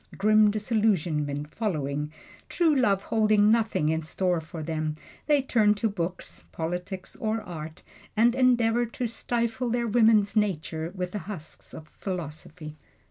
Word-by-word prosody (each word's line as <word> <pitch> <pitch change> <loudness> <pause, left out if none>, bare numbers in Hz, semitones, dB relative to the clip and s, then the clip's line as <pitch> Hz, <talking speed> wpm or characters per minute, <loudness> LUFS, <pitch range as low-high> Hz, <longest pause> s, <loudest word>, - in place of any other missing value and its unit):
Grim 215 +1 +5
disillusionment 175 - 0
following, 150 -8 -2 0.4
true 330 -3 +3
love 200 -7 +2
holding 215 -1 +3
nothing 220 -9 +2
in 160 0 0
store 175 +2 -1
for 160 0 -8
them, 155 -1 -2 0.3
they 290 -3 +3
turn 215 -5 +3
to 215 +2 0
books, 180 -3 -5
politics 180 +3 -5
or 220 0 -1
art, 160 -3 -8 0.3
and 235 +2 +5
endeavor 240 -2 +3
to 245 +2 -4
stifle 235 +1 -2
their 240 0 0
woman's 220 -2 +4
nature 170 -5 -1
with 180 -1 -3
the 210 - -3
husks 165 -7 -7
of 155 - -10
philosophy. 155 -3 -7
200 Hz, 135 wpm, -27 LUFS, 160-225 Hz, 0.4 s, Grim